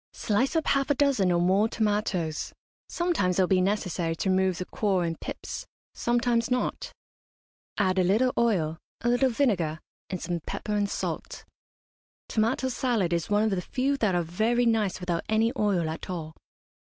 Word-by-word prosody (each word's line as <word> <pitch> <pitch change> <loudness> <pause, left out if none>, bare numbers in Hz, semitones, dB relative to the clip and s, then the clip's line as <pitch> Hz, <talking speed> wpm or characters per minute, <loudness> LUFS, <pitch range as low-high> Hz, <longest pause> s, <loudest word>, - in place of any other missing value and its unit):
Slice 250 +8 0
up 320 - +1
half 275 0 +1
a 285 - +3
dozen 265 -10 +2
or 175 - +2
more 190 +5 +3
tomatoes 205 -8 -1 0.4
sometimes 325 - 0
it 190 - +5
will - - +1
be 185 0 +3
necessary 185 -4 -1
to 190 +3 0
remove 185 -1 +2
the 180 - -4
core 195 -3 0
and 165 -1 -3
pips, - - -6 0.3
sometimes 240 0 +1
not; 250 0 -1 0.9
add 190 -2 +2
a - - +4
little 220 +8 +2
oil, 175 -9 +1 0.2
a 240 - +1
little 245 +2 +3
vinegar, 195 - 0 0.3
and 185 - -3
some 170 +1 -3
pepper 210 +6 -5
and 205 -1 +1
salt. - - -4 0.8
Tomato 230 +4 +1
salad 235 -8 0
is 170 -2 -1
one 205 +1 +3
of 220 - +1
the 190 -2 0
few 265 +8 0
that 210 -8 +1
are 175 - +1
very 220 +9 +1
nice 220 -5 +1
without 175 -2 -1
any 220 +2 +2
oil 200 -8 +1
at 160 +3 -6
all. 160 -4 -5
205 Hz, 175 wpm, -27 LUFS, 180-235 Hz, 0.9 s, it